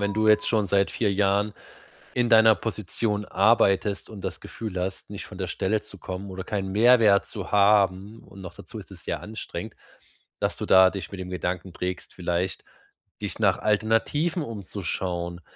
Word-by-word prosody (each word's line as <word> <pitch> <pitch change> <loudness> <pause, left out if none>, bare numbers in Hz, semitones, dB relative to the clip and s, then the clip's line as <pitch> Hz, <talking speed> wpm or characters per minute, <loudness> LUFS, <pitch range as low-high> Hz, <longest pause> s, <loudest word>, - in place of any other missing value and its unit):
wenn 100 0 0
du 110 +1 +1
jetzt 105 0 +4
schon 110 -3 +1
seit 100 +1 +2
4 105 -4 0
Jahren 100 +1 +1 0.6
in 120 -1 +1
deiner 110 -1 +7
Position 105 +1 -2
arbeitest 100 -1 +2
und 100 -3 -9
das - - -5
Gefühl 105 -5 -6
hast, 95 +1 -4
nicht 100 -1 -7
von 100 -2 -11
der 95 - -2
Stelle 105 +4 -1
zu 100 - -13
kommen 95 +2 -6
oder 95 0 -6
keinen 95 -1 -3
Mehrwert 110 -2 +5
zu 100 -4 -7
haben, 100 0 +3
und 95 - -13
noch 90 - -8
dazu - - -11
ist - - -10
es - - -12
sehr - - -3
anstrengend, 110 +1 -7 0.7
dass - - -1
du - - -4
da 95 0 +7
dich 95 -2 -6
mit 100 - -7
dem 90 0 -6
Gedanken 90 0 -3
trägst, 90 +1 -5
vielleicht 90 +1 -2 0.6
dich - - -3
nach - - +3
Alternativen 115 - +1
umzuschauen. 90 - -4
100 Hz, 175 wpm, -25 LUFS, 95-110 Hz, 0.7 s, deiner